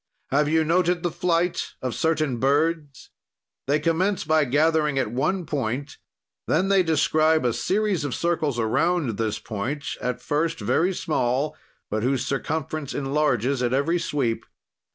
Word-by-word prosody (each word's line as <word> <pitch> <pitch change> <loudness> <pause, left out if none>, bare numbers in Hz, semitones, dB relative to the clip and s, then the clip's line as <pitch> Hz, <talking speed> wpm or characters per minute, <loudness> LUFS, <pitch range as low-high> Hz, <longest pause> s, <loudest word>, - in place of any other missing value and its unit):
"Have 145 +2 +2
you 160 +1 +3
noted 175 +2 +1
the 175 - 0
flight 175 +1 0
of 130 -2 -3
certain 155 -5 0
birds? 145 +1 0 0.6
"They 145 +2 +3
commence 175 +5 +1
by 155 -2 +3
gathering 150 +1 +2
at 130 -5 0
one 175 +9 0
point, 140 -1 -3 0.5
then 185 +5 +2
they 195 -1 +5
describe 160 -2 +2
a 120 - +2
series 190 - 0
of 145 -4 -2
circles 160 -6 0
around 120 - 0
this 110 -2 -1
point, 130 +8 -4 0.2
at 125 0 -2
first 160 +5 -1
very 180 +3 +1
small, 135 -2 0 0.4
but 110 +1 0
whose 130 +2 0
circumference 150 +1 -3
enlarges 135 -3 0
at 125 0 0
every 155 +6 +1
sweep. 135 -8 -2
150 Hz, 145 wpm, -24 LUFS, 130-165 Hz, 0.6 s, they